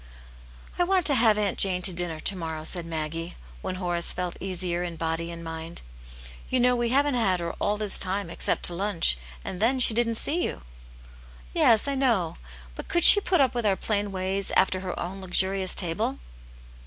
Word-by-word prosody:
" -, -, -21 dB
I -, -, +4 dB
want 370 Hz, -1 st, +1 dB
to 290 Hz, -, +1 dB
have 225 Hz, -4 st, +3 dB
Aunt 205 Hz, -2 st, -2 dB
Jane 185 Hz, -2 st, +1 dB
to 185 Hz, -, 0 dB
dinner 170 Hz, -2 st, -5 dB
to 195 Hz, -, 0 dB
morrow," 160 Hz, -3 st, -6 dB
said 170 Hz, +1 st, -5 dB
Maggie, 165 Hz, +1 st, -5 dB, 0.3 s
when 185 Hz, -, -4 dB
Horace 175 Hz, -2 st, -1 dB
felt 180 Hz, -1 st, -4 dB
easier 180 Hz, -2 st, -3 dB
in 175 Hz, -1 st, -5 dB
body 165 Hz, +1 st, -3 dB
and 170 Hz, 0 st, -8 dB
mind. 165 Hz, 0 st, -8 dB, 0.7 s
"You 255 Hz, -, 0 dB
know 250 Hz, 0 st, +3 dB
we 240 Hz, -1 st, -1 dB
haven't 280 Hz, +3 st, +1 dB
had 195 Hz, -7 st, +1 dB
her 170 Hz, -1 st, -4 dB
all 205 Hz, +1 st, 0 dB
this 210 Hz, -2 st, 0 dB
time, 195 Hz, 0 st, -1 dB
except -, -, -1 dB
to 175 Hz, -, +1 dB
lunch, 180 Hz, -, 0 dB, 0.3 s
and 185 Hz, -, -6 dB
then 255 Hz, +4 st, +1 dB
she 235 Hz, -, +3 dB
didn't 230 Hz, 0 st, 0 dB
see 325 Hz, +9 st, +2 dB
you." -, -, -4 dB, 0.9 s
"Yes, 225 Hz, +3 st, +3 dB
I 280 Hz, -, -1 dB
know. 235 Hz, -11 st, 0 dB, 0.4 s
But -, -, -8 dB
could 345 Hz, -, 0 dB
she 410 Hz, -, +13 dB
put 360 Hz, -5 st, +1 dB
up 265 Hz, -, +2 dB
with 240 Hz, -1 st, -3 dB
our 200 Hz, -2 st, +2 dB
plain 205 Hz, 0 st, -2 dB
ways, 190 Hz, +1 st, -2 dB
after 190 Hz, 0 st, +2 dB
her 185 Hz, -1 st, -6 dB
own 190 Hz, +3 st, -6 dB
luxurious 190 Hz, +1 st, 0 dB
table?" 165 Hz, -, -2 dB
190 Hz, 200 wpm, -25 LUFS, 170-230 Hz, 0.9 s, she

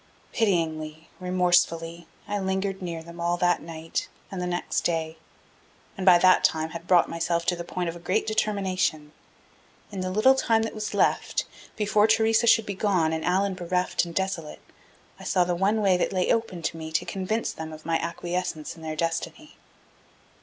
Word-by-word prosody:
Pityingly, 160 Hz, -6 st, -1 dB
remorsefully, 175 Hz, -2 st, +1 dB, 0.2 s
I 205 Hz, 0 st, -1 dB
lingered 190 Hz, 0 st, -2 dB
near 170 Hz, -3 st, -5 dB
them 170 Hz, +1 st, -12 dB
all 175 Hz, +1 st, +1 dB
that 175 Hz, 0 st, +2 dB
night 165 Hz, 0 st, -4 dB, 0.2 s
and 190 Hz, -2 st, -4 dB
the 180 Hz, -, -2 dB
next 175 Hz, 0 st, -1 dB
day. 160 Hz, -1 st, -1 dB, 0.8 s
And 195 Hz, -1 st, -5 dB
by 180 Hz, -2 st, +9 dB
that 185 Hz, +1 st, +5 dB
time 160 Hz, 0 st, +1 dB
had 170 Hz, +1 st, -8 dB
brought 180 Hz, -2 st, +5 dB
myself 170 Hz, 0 st, -1 dB
to 180 Hz, -, +2 dB
the 170 Hz, -, -6 dB
point 175 Hz, +1 st, -3 dB
of 165 Hz, -, -3 dB
a -, -, -9 dB
great 175 Hz, +2 st, 0 dB
determination. 190 Hz, -8 st, -1 dB, 0.8 s
In 195 Hz, -2 st, -4 dB
the 185 Hz, -, -2 dB
little 215 Hz, +8 st, +5 dB
time 230 Hz, -4 st, +2 dB
that 225 Hz, -, -3 dB
was 215 Hz, -1 st, -4 dB
left, -, -, +1 dB, 0.3 s
before 210 Hz, 0 st, +3 dB
Theresa 225 Hz, +1 st, +3 dB
should 225 Hz, -1 st, +5 dB
be 205 Hz, -, -3 dB
gone 185 Hz, -5 st, +1 dB
and 160 Hz, 0 st, -2 dB
Allan 190 Hz, +2 st, +1 dB
bereft 180 Hz, 0 st, 0 dB
and 170 Hz, -1 st, -7 dB
desolate, 190 Hz, -5 st, -3 dB, 0.6 s
I -, -, -10 dB
saw 180 Hz, -, +2 dB
the 175 Hz, 0 st, -1 dB
one 200 Hz, +5 st, +1 dB
way 190 Hz, -3 st, +4 dB
that -, -, 0 dB
lay 185 Hz, -2 st, +1 dB
open 190 Hz, -7 st, -1 dB
to 165 Hz, -, -2 dB
me 160 Hz, 0 st, -7 dB
to 165 Hz, -, +1 dB
convince 200 Hz, +4 st, -2 dB
them 160 Hz, 0 st, -7 dB
of 155 Hz, 0 st, -11 dB
my 165 Hz, 0 st, +1 dB
acquiescence 170 Hz, -1 st, -3 dB
in 165 Hz, -, -14 dB
their 155 Hz, -1 st, -4 dB
destiny. 165 Hz, -, -3 dB
180 Hz, 185 wpm, -26 LUFS, 165-195 Hz, 0.8 s, by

